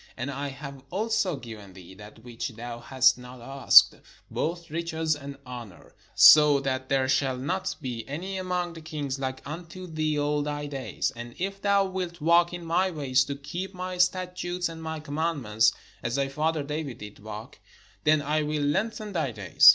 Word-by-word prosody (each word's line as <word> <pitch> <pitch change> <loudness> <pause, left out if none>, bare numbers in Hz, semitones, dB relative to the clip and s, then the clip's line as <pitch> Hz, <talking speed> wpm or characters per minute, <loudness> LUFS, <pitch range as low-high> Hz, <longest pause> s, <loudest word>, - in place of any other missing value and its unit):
And 130 +3 -3
I 140 +1 -3
have 140 0 -8
also 205 -2 0
given 110 -7 -10
thee 90 -1 -12
that 105 +3 -13
which 120 0 -5
thou 120 +1 -6
hast 130 +1 +3
not 125 0 -11
asked, 135 +3 +6 0.4
both 170 0 -3
riches, 160 -1 -1
and 140 -1 -8
honour: 120 -7 -10 0.2
so 150 -2 +9
that 130 -1 -2
there 135 -1 +2
shall 135 -1 +1
not 185 +9 -2
be 120 -3 -4
any 185 +7 -4
among 180 -2 -2
the 165 - -10
kings 145 -4 -4
like 130 -1 -4
unto 175 +4 -7
thee 155 -3 -1
all 145 0 +1
thy 145 0 -3
days. 135 -5 -2
And 120 0 -8
if 195 +2 -3
thou 200 -1 +3
wilt 185 -2 -4
walk 170 +2 +4
in 175 -1 -6
my 180 +3 +2
ways, 135 -6 +2
to 140 - -4
keep 175 +8 -6
my 180 0 -5
statutes 180 -1 0
and 165 0 -8
my 160 0 -4
commandments, 145 -8 +1 0.3
as 120 +1 -2
thy 140 -1 0
father 155 +2 0
David 150 -3 -4
did 105 -1 -10
walk, - - -9 0.4
then 150 -1 +4
I 155 +1 +1
will 150 0 -1
lengthen 210 +8 -1
thy 160 -6 0
days." 100 -6 +6
150 Hz, 180 wpm, -27 LUFS, 130-170 Hz, 0.4 s, so